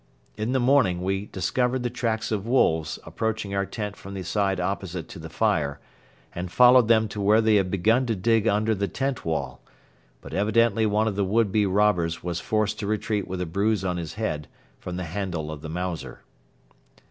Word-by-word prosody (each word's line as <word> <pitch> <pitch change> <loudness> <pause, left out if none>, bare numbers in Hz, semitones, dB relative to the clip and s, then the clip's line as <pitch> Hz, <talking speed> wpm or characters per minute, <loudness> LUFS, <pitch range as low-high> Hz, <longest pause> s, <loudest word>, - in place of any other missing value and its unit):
In 110 +3 -2
the 130 - +2
morning 120 -9 +3
we 95 +2 -1
discovered 125 +8 -1
the 120 - -1
tracks 115 -3 -2
of 105 0 -2
wolves 80 - +2
approaching 110 -2 -3
our 100 -1 0
tent 105 -2 -5
from 100 0 -10
the 95 - -4
side 95 -1 0
opposite 90 -2 -3
to 95 - -9
the 80 0 -8
fire 80 -9 0 0.5
and 90 0 -5
followed 125 0 +6
them 110 -1 +4
to 105 - -5
where 105 +2 +4
they 110 -1 +4
had 95 -2 +1
begun 110 +7 +2
to 115 - 0
dig 115 +3 +2
under 110 +1 +2
the 100 -1 -1
tent 135 +1 -3
wall; 70 -6 -3 0.6
but - - -11
evidently 110 +2 +2
one 105 +1 +1
of 105 - -1
the 100 - +1
would 105 +2 +1
be 105 0 +2
robbers 95 -4 +1
was 85 -1 -2
forced 110 +2 -1
to 105 - -3
retreat 105 -1 -1
with 95 -1 -4
a - - -1
bruise 100 +3 0
on 90 -1 -1
his 85 -3 -5
head 75 -9 -3 0.3
from 90 - -6
the 90 - -3
handle 85 -3 -4
of 75 -2 -7
the 80 - -7
Mauser. 90 0 -5
100 Hz, 200 wpm, -25 LUFS, 90-110 Hz, 0.6 s, followed